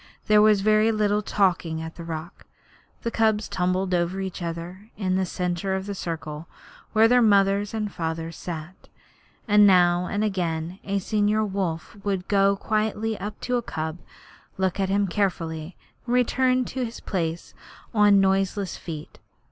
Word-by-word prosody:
There 210 0 +5
was 210 -2 +5
very 215 +2 +4
little 210 -1 +1
talking 180 -6 0
at 160 0 -6
the 170 - -9
rock. 165 +1 -7 0.6
The 230 - -1
cubs 220 -2 +1
tumbled 185 +1 0
over 175 +2 0
each 190 -1 -5
other 170 +5 -6
in 185 -3 0
the 190 -1 0
centre 180 +2 -2
of 190 0 -3
the 200 - -4
circle 160 -3 -5 0.5
where 220 +1 +6
their 245 +1 +5
mothers 200 -1 +3
and 215 -2 -3
fathers 165 -1 -4
sat, 170 +1 -8 0.6
and 210 -1 +6
now 180 -1 +4
and 205 +1 -1
again 175 -3 -2
a 200 0 -1
senior 210 +2 +1
wolf 190 -3 -3
would 195 -2 -2
go 200 -1 +3
quietly 215 +1 -1
up 210 +1 -6
to 250 0 0
a - - -1
cub, 160 -5 -4 0.6
look 190 0 0
at 190 -1 0
him 200 +1 +2
carefully, 170 -4 -2 0.3
and 240 - +1
return 255 +1 +2
to 260 +1 -3
his 235 -1 -5
place 170 -3 -3 0.4
on 205 -2 +5
noiseless 195 0 +1
feet. 155 -3 -8
195 Hz, 160 wpm, -25 LUFS, 175-210 Hz, 0.6 s, where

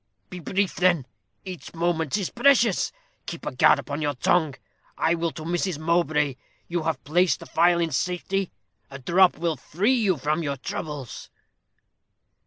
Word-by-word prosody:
"Be 180 - -6
brief, 190 +3 -1
then 175 -7 +3 0.4
each 180 -2 -8
moment 165 -1 0
is 195 -4 -3
precious. 245 -8 +3 0.4
Keep - - -7
a - - -2
guard - - +5
upon 145 +1 -5
your 145 -2 -1
tongue. 155 +1 +1 0.4
I 165 - +2
will 170 0 -1
to 155 - -8
Mrs. 175 0 -1
Mowbray. 155 -4 +1 0.3
You 175 0 -2
have 155 -4 -2
placed 175 +5 +2
the - - -10
phial 170 +1 +3
in 165 -1 0
safety. 180 +6 -2 0.4
A 140 - -8
drop 175 +7 +3
will 165 0 -1
free 205 - 0
you 210 -9 +2
from 150 +4 -1
your 140 -3 -3
troubles." 140 -1 -6
170 Hz, 160 wpm, -25 LUFS, 150-180 Hz, 0.4 s, guard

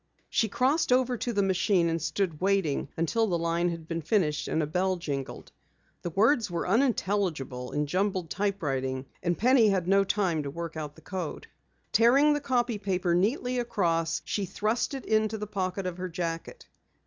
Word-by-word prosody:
She 220 - +2
crossed 265 +8 +1
over 250 0 +3
to 240 +1 -2
the 205 -3 +1
machine 190 -2 +2
and 165 0 -1
stood 170 -1 -2
waiting 190 -8 +1
until 220 +8 +1
the 175 -4 +1
line 170 +1 0
had 165 -2 -6
been 165 0 -3
finished 155 -3 0
and 160 - 0
a - - +1
bell 185 +5 0
jingled. 140 -6 -5 0.5
The 175 - -3
words 220 - +3
were 170 0 -2
unintelligible 185 - 0
in 150 0 0
jumbled 185 +1 -1
typewriting, 135 -10 -1 0.2
and 175 -1 0
Penny 250 0 +5
had 185 -3 0
no 195 +1 +5
time 190 -5 0
to 140 - -4
work 165 +3 -6
out 150 -2 -5
the 160 - -16
code. 180 -4 -5 0.5
Tearing 275 +6 +5
the 295 - -1
copy 240 -5 0
paper 185 -3 0
neatly 245 - +1
across, 165 -8 0
she 205 - -1
thrust 215 +9 -1
it 270 - -7
in 215 0 +2
the 215 -1 -4
pocket 190 -2 -3
of 180 -1 -3
her 185 0 -3
jacket. 170 - -5
185 Hz, 180 wpm, -28 LUFS, 165-215 Hz, 0.5 s, Penny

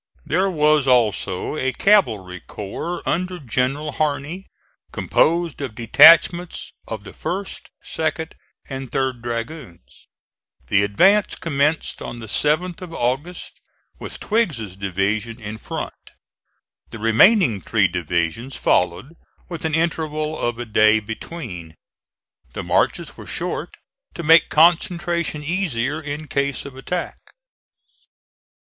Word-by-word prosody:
There 185 +5 +1
was 150 -4 +3
also 110 -4 +1
a 130 -3 -1
cavalry 110 - +2
corps 105 - -6
under 180 +1 -1
General 135 +2 -1
Harney, 150 +5 -2 0.4
composed 170 -2 +1
of 130 -6 -5
detachments 165 +8 +5
of 110 -3 -6
the 95 - -10
1st, 195 +2 -5 0.2
2d, 160 0 -2 0.4
and 135 -2 -6
3d 130 -3 -1
dragoons. 115 - -7 0.6
The 100 - +4
advance 190 - +3
commenced 150 0 -1
on - - -6
the 115 - -8
7th 155 - 0
of 170 -3 -8
August 135 +9 -3 0.4
with - - -8
Twiggs's 155 - -1
division 100 +4 -2
in 110 0 -7
front. - - -7 0.8
The - - -8
remaining 115 - +4
three 105 -4 +2
divisions 85 - -2
followed, 90 - 0 0.3
with 170 -2 -6
an 155 -1 0
interval 155 -2 -1
of 120 -4 -2
a 120 - -5
day 110 0 +4
between. 105 - -8 0.8
The - - -5
marches - - 0
were - - -11
short, - - -3 0.4
to 170 - -5
make 165 +1 +6
concentration 170 -1 +2
easier 155 -4 -1
in 150 0 -6
case 140 -1 -2
of 140 -2 -9
attack. 175 +7 -4
140 Hz, 115 wpm, -21 LUFS, 110-165 Hz, 0.8 s, make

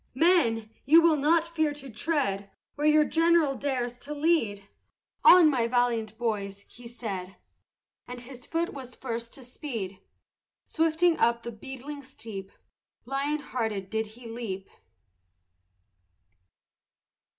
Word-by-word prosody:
"Men, 240 -9 +3
you 315 +5 +7
will 330 -1 +5
not 310 +3 +3
fear 315 -3 0
to 275 -2 -9
tread 215 -7 -1 0.2
Where 295 +1 0
your 305 0 +5
general 330 -3 +3
dares 250 -3 -2
to 295 +3 -6
lead! 260 -11 +1 0.6
On, 355 -2 +9
my 250 -6 +2
valiant 235 -3 0
boys!" 200 -4 -3
he 240 0 -13
said, 200 -6 -6 0.7
And 245 0 -7
his 250 0 -11
foot 335 +1 -1
was 255 -3 -9
first 230 -2 -5
to 270 - -12
speed; 230 - -6 0.7
Swiftly 325 +1 +2
up 235 0 +2
the 235 - -5
beetling 265 +5 -8
steep, 220 -8 -9 0.5
Lion 275 +3 -1
hearted, 220 -9 -3
did 220 0 -1
he 245 -1 -11
leap. 220 -5 -6
250 Hz, 125 wpm, -28 LUFS, 225-300 Hz, 0.7 s, On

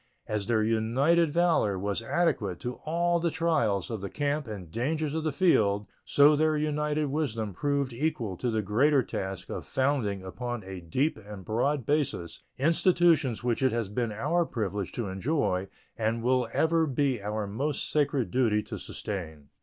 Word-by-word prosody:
As 105 -2 -2
their 110 -2 +2
united 130 +10 +2
valor 160 - +2
was 100 +3 -2
adequate 115 - 0
to 125 0 -5
all 170 +2 +1
the 170 0 +1
trials 120 - 0
of 110 -4 -4
the 100 - -4
camp 145 -1 -1
and 95 -7 -7
dangers 150 - -1
of 160 0 -2
the 155 - 0
field, 105 - +3 0.2
so 145 +1 +5
their 155 +1 +2
united 150 0 0
wisdom 115 -9 -2
proved 140 +4 -1
equal 120 -7 -2
to 125 - -1
the 110 -2 0
greater 130 +7 +3
task 95 -4 -5
of - - -4
founding 130 -8 0
upon 120 +4 -5
a 95 -1 -7
deep 125 - 0
and 100 -2 -9
broad 125 +4 0
basis 135 - -1 0.2
institutions 160 - +3
which 120 0 0
it 130 -1 +3
has 115 -3 -2
been 115 +2 -1
our 150 +11 +1
privilege 105 - -3
to 115 -4 -3
enjoy 95 - -1 0.3
and 115 +1 -1
will 125 -1 +2
ever 160 0 +2
be 135 -4 0
our 105 +1 -2
most 135 +9 -2
sacred 145 -5 +1
duty 115 -5 +2
to - - -7
sustain. 80 -8 -6
125 Hz, 170 wpm, -28 LUFS, 105-150 Hz, 0.3 s, so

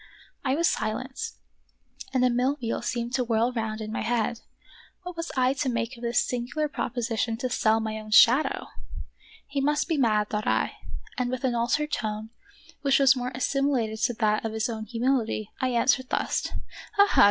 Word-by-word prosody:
I 265 -1 +1
was 335 +2 +2
silent, 240 - -2 0.8
and 255 -1 +3
a 250 - +3
mill 255 +4 +1
wheel 230 -2 -2
seemed 240 -1 -3
to 255 -1 +2
whirl 230 +1 +1
round 220 -2 -3
in 215 0 -5
my - - -2
head. 235 -1 0 0.6
What 360 -1 -7
was 335 0 -4
I 255 +1 +3
to 275 -1 -1
make 235 +1 -2
of 235 - -14
this 235 0 +2
singular 250 +5 -2
proposition 230 -4 -2
to 250 +1 -3
sell 220 0 +3
my 220 0 -3
own 215 0 -10
shadow 240 +6 +5 0.8
He 280 0 -2
must 295 +2 +1
be 325 -4 0
mad, 215 -4 +2
thought 210 0 -2
I, - - +1 0.4
and 250 -1 0
with 255 0 -3
an 255 -2 +1
altered 245 +6 0
tone, 215 -1 -3 0.5
which 275 -1 +4
was 270 -1 +6
more 250 0 -3
assimilated 255 -4 0
to 240 +1 +1
that 215 -1 +1
of 225 -1 -3
his 220 +1 -1
own 220 -1 -4
humility, 230 -2 0
I 260 - +2
answered 255 +1 +2
thus: - - 0 0.2
— - - -14
"Ha! 405 0 +6
ha! - - +3
245 Hz, 190 wpm, -27 LUFS, 225-265 Hz, 0.8 s, was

